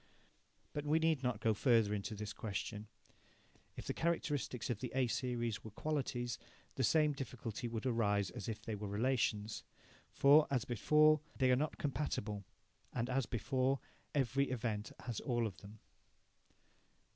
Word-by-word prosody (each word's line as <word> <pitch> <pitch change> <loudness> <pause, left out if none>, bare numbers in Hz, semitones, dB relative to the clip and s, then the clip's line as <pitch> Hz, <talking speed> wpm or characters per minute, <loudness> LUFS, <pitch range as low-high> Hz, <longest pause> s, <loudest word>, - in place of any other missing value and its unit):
But 145 - -2
we 150 +2 +3
need 160 -3 +2
not 125 -4 -1
go 110 -1 +3
further 115 -2 +4
into 105 +1 -3
this 105 +1 -5
question. 105 0 -4 0.9
If - - -6
the - - -1
characteristics 145 -7 -1
of 110 - -2
the 125 - -4
A 130 -1 +4
series 120 -2 -1
were 110 - -7
qualities, 120 -2 -2 0.3
the - - -1
same 155 -2 +4
difficulty 125 -4 -5
would 115 +1 -4
arise 105 -5 +2
as 105 - -5
if 110 -1 -5
they 110 - -3
were 105 0 -4
relations. 110 -1 0 0.5
For, 145 +2 +6
as 130 -4 +1
before, 150 +6 +5 0.2
they 130 -1 +4
are - - +6
not 150 +4 -1
compatible, 110 -8 -2 0.5
and, 120 +2 -2
as 130 -1 +1
before, 130 +3 +1 0.4
every 135 0 +2
event 110 -4 -2
has 120 -4 -3
all 120 -3 0
of 100 -3 -4
them. 105 +2 -12
120 Hz, 155 wpm, -37 LUFS, 110-135 Hz, 0.9 s, For